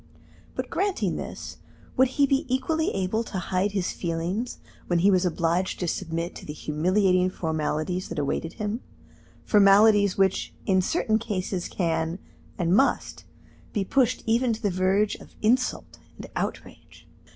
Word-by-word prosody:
But - - -4
granting 400 0 0
this, - - -7 0.4
would 260 +1 +5
he 285 - +6
be 270 -2 0
equally 315 +5 +1
able 195 +4 0
to 195 - -5
hide 185 +3 -1
his 190 -3 -1
feelings 175 +8 -3 0.3
when 175 - +2
he 190 +4 +4
was 185 -1 +3
obliged 170 +2 0
to 180 - -1
submit 170 0 -3
to - - -11
the 150 - -5
humiliating 180 +5 +2
formalities 160 +1 -2
that 170 - -6
awaited 150 +3 -2
him 215 +2 -3 0.6
formalities 205 -1 +5
which 190 -1 +1
in 190 -1 +3
certain 220 - +1
cases 190 -5 -3
can, 165 -1 -1 0.4
and 175 0 +2
must, 270 +6 +1 0.5
be 205 -3 0
pushed 255 +2 +1
even 235 +1 +2
to 220 - -6
the 205 - +2
verge 190 +3 +2
of - - -16
insult 250 +4 +1 0.2
and - - -8
outrage? - - -6
190 Hz, 150 wpm, -26 LUFS, 175-220 Hz, 0.6 s, he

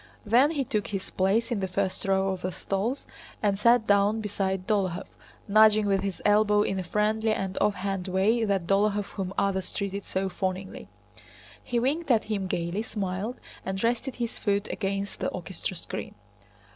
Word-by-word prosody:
Then 245 +7 +5
he 300 -4 0
took 215 -4 -2
his 195 -2 -5
place 210 +6 +1
in 230 - 0
the 190 - -1
first 190 +1 -2
row 195 0 +2
of 190 -1 -3
the 185 - -2
stalls 200 +9 -2 0.4
and 200 -1 +2
sat 235 +1 +5
down 205 +1 +3
beside 195 -3 -2
Dólokhov, 190 -4 0 0.4
nudging 215 0 +6
with 195 -1 +2
his 195 -2 -4
elbow 210 0 +4
in 195 - -1
a - - -2
friendly 215 +4 +1
and 195 -3 -2
offhand 195 -2 0
way 200 +5 +2
that 195 -5 +1
Dólokhov 200 +2 +1
whom 190 -2 -4
others 190 -2 0
treated 200 0 -3
so 190 +1 -1
fawningly. 190 0 -4 0.8
He 245 - -2
winked 285 +6 0
at 230 -4 +4
him 205 -3 -2
gaily, 170 +3 -1
smiled, 205 +1 -3 0.3
and 190 +1 -3
rested 240 +3 0
his 235 -2 -3
foot 200 0 0
against 195 0 -3
the - - -1
orchestra - - -5
screen. - - -6
200 Hz, 170 wpm, -27 LUFS, 190-215 Hz, 0.8 s, nudging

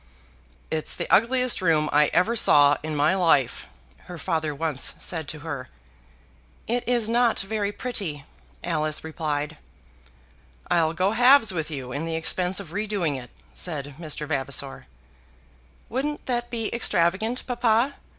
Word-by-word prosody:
"It's 155 -1 -2
the - - -3
ugliest 250 +1 +3
room 160 -4 +3
I 150 0 +5
ever 220 +6 +2
saw 145 -9 +6
in 155 0 -4
my 150 +5 +3
life," 160 -9 +2 0.4
her 180 -1 -8
father 160 -3 -2
once 150 -2 -1
said 160 -4 -3
to 150 0 -6
her. 145 -5 -6 1.0
"It 240 +2 -1
is 240 -3 +1
not 235 0 +2
very 205 0 -2
pretty," 195 - -4 0.4
Alice 155 0 -2
replied. 155 -1 -3 1.1
"I'll 160 -1 +3
go 185 +4 +1
halves 245 -1 +5
with 160 -3 -3
you 135 -5 -6
in 145 +5 -3
the 165 0 -3
expense 180 +3 +1
of 185 -6 -8
redoing 205 -6 -1
it," 125 -2 -8 0.2
said 145 -5 -4
Mr. 155 -2 -4
Vavasor. 135 - -2 1.0
"Wouldn't 290 +5 -3
that 240 -1 -2
be 225 -2 -3
extravagant, 220 +2 +1
papa? 240 +1 +1
170 Hz, 140 wpm, -25 LUFS, 150-225 Hz, 1.1 s, saw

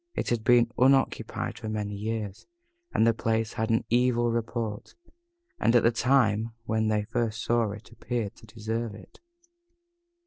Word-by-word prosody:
It - - -2
had 120 -2 0
been 120 0 +4
unoccupied 125 -3 +2
for 110 -2 -5
many 105 -1 -3
years, 105 -1 -4 0.4
and 110 - +3
the 115 - +4
place 110 0 -1
had 110 +1 -2
an 115 0 +1
evil 120 -1 +3
report, 115 -2 -3 0.6
and, 115 - +3
at 120 - +5
the 115 - +5
time 115 -3 +2
when 110 -1 0
they 105 -1 +1
first 115 0 -2
saw 120 -2 +2
it, 105 +3 -9
appeared 115 -3 -3
to 110 - -16
deserve 110 0 -4
it. - - -15
115 Hz, 160 wpm, -27 LUFS, 110-120 Hz, 0.6 s, at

